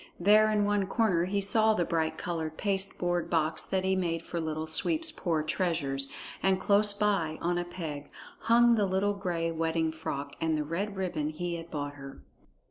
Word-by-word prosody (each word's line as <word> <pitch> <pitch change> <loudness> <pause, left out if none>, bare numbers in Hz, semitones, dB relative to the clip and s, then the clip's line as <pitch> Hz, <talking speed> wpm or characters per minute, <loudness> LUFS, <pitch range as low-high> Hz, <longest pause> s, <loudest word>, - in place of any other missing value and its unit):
There 210 +4 +5
in 210 -1 +2
one 205 -1 +1
corner 195 -6 +2
he 200 +2 -1
saw 220 +2 +3
the 175 - +1
bright 160 -1 -1
colored 160 -2 -4
pasteboard 190 -3 -1
box 160 -1 0
that 190 -1 -2
he 190 - +1
had 190 - +1
made 165 -2 -1
for 170 0 -4
Little 155 0 -3
Sweep's 315 - 0
poor 160 -4 -1
treasures, 155 -5 0 0.3
and 190 -1 +2
close 205 +2 +4
by, 200 -7 0
on 175 +1 0
a 175 - -3
peg, 155 -5 -6 0.3
hung 235 +1 +5
the 210 -3 +2
little 190 +2 +1
gray 175 -4 -2
wedding 160 0 0
frock 140 -3 -5
and 160 -1 +1
the 150 - -1
red 190 +7 -3
ribbon 175 -6 -2
he 170 +2 -4
had 165 0 -9
bought 145 -2 -4
her. 135 0 -10
175 Hz, 190 wpm, -29 LUFS, 160-200 Hz, 0.3 s, There